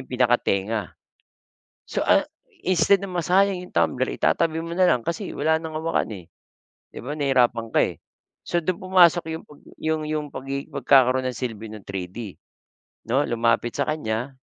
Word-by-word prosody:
yung 130 Hz, -, -12 dB
pinakatenga. 115 Hz, -4 st, +1 dB, 1.0 s
So, -, -, -3 dB
ah, -, -, +4 dB, 0.4 s
instead 185 Hz, +2 st, +4 dB
na 195 Hz, -, -6 dB
masayang 185 Hz, +1 st, +1 dB
'yong 180 Hz, -, -10 dB
tumbler, 130 Hz, 0 st, +1 dB
itatabi 165 Hz, -1 st, +1 dB
mo 165 Hz, +1 st, -4 dB
na 180 Hz, 0 st, +4 dB
lang 125 Hz, -2 st, +1 dB
kasi 175 Hz, +4 st, -3 dB
wala 160 Hz, +2 st, +2 dB
nang 160 Hz, -1 st, -5 dB
hawakan, 165 Hz, -6 st, -1 dB
eh, 95 Hz, -5 st, -8 dB, 0.6 s
di -, -, -10 dB
ba 145 Hz, -, -3 dB
nahirapan 125 Hz, -6 st, +1 dB
ka, -, -, +3 dB
eh. -, -, -7 dB, 0.4 s
So, 175 Hz, -, -2 dB
dun 185 Hz, 0 st, -1 dB
pumasok 175 Hz, -3 st, +4 dB
'yong 160 Hz, 0 st, -5 dB
pag 150 Hz, -, -17 dB, 0.2 s
'yong 155 Hz, 0 st, -1 dB
'yong 150 Hz, -1 st, -2 dB
pagi 135 Hz, +1 st, -4 dB
pagkakaroon 130 Hz, -1 st, +3 dB
ng 125 Hz, -, -7 dB
silbi 110 Hz, -4 st, -5 dB
ng 105 Hz, -3 st, -10 dB
3D 95 Hz, +2 st, -6 dB, 0.8 s
'no. 135 Hz, +4 st, +2 dB
Lumapit 115 Hz, 0 st, +1 dB
sa 140 Hz, -, -1 dB
kanya, 130 Hz, -3 st, -3 dB
140 Hz, 165 wpm, -24 LUFS, 120-165 Hz, 1.0 s, ah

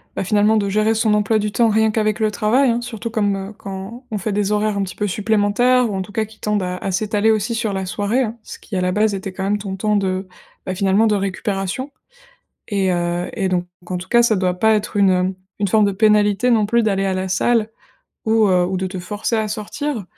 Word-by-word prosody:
bah, -, -, -1 dB
finalement, 210 Hz, +2 st, +3 dB
de 200 Hz, -2 st, 0 dB
gérer 215 Hz, +2 st, +2 dB
son 220 Hz, -1 st, +2 dB
emploi 210 Hz, +1 st, +2 dB
du 210 Hz, 0 st, -2 dB
temps 230 Hz, +2 st, +3 dB
rien 220 Hz, 0 st, +3 dB
qu'avec 215 Hz, 0 st, 0 dB
le 215 Hz, -1 st, +1 dB
travail 235 Hz, +6 st, +2 dB
hein, 235 Hz, 0 st, 0 dB
surtout 235 Hz, -1 st, -5 dB
comme, 205 Hz, -3 st, 0 dB
heu, 195 Hz, +2 st, -6 dB
quand 195 Hz, +6 st, -8 dB
on 215 Hz, -, -1 dB
fait 205 Hz, +2 st, -3 dB
des 205 Hz, 0 st, 0 dB
horaires 210 Hz, 0 st, +1 dB
un 200 Hz, -, 0 dB
petit 185 Hz, -, -6 dB
peu 210 Hz, -, -1 dB
supplémentaires 220 Hz, +5 st, +2 dB
ou 200 Hz, -, -3 dB
en 190 Hz, -, -2 dB
tout 190 Hz, -, -8 dB
cas 220 Hz, 0 st, -1 dB
qui 220 Hz, +1 st, -18 dB
tendent 210 Hz, -2 st, -1 dB
à 180 Hz, 0 st, -3 dB
à 195 Hz, -, -3 dB
s'étaler 210 Hz, +3 st, +1 dB
aussi 220 Hz, +2 st, 0 dB
sur 220 Hz, -3 st, -1 dB
la 190 Hz, -1 st, -2 dB
soirée 205 Hz, +7 st, 0 dB
hein, 230 Hz, 0 st, -4 dB
ce -, -, -10 dB
qui 210 Hz, -, -8 dB
à -, -, 0 dB
la 180 Hz, 0 st, +1 dB
base 210 Hz, +1 st, +2 dB
était 190 Hz, 0 st, -6 dB
quand 190 Hz, -, -5 dB
même 200 Hz, +2 st, +1 dB
ton 195 Hz, -2 st, -5 dB
temps 210 Hz, +2 st, 0 dB
de, 190 Hz, -1 st, -1 dB, 0.4 s
bah, 185 Hz, -, -3 dB
finalement, 195 Hz, +4 st, +3 dB
de 210 Hz, -, +2 dB
récupération. 195 Hz, +5 st, -3 dB, 0.8 s
Et 195 Hz, -3 st, 0 dB
heu 175 Hz, 0 st, -1 dB
et 190 Hz, -, -1 dB
donc 180 Hz, -1 st, 0 dB, 0.2 s
en 180 Hz, -, -2 dB
tout 180 Hz, +1 st, -8 dB
cas 235 Hz, +3 st, +4 dB
ça 235 Hz, -2 st, +3 dB
doit 185 Hz, -2 st, +1 dB
pas 220 Hz, +2 st, +4 dB
être 210 Hz, 0 st, -3 dB
une, 200 Hz, -1 st, +4 dB
heu, 185 Hz, +1 st, +1 dB, 0.3 s
une 205 Hz, -, +1 dB
forme 215 Hz, +3 st, +3 dB
de 200 Hz, -, +1 dB
pénalité 210 Hz, +3 st, +3 dB
non 220 Hz, -3 st, +3 dB
plus 235 Hz, +2 st, +2 dB
d'aller 195 Hz, -2 st, +1 dB
à 190 Hz, -, 0 dB
la 185 Hz, 0 st, -2 dB
salle 220 Hz, +4 st, +1 dB, 0.6 s
ou, 220 Hz, -1 st, +3 dB
heu, 180 Hz, -1 st, +3 dB
ou 185 Hz, +1 st, -2 dB
de 185 Hz, +1 st, -2 dB
te 185 Hz, -, -6 dB
forcer 205 Hz, +6 st, -3 dB
à 220 Hz, -1 st, 0 dB
sortir. 220 Hz, +4 st, -4 dB
210 Hz, 255 wpm, -20 LUFS, 190-220 Hz, 0.8 s, cas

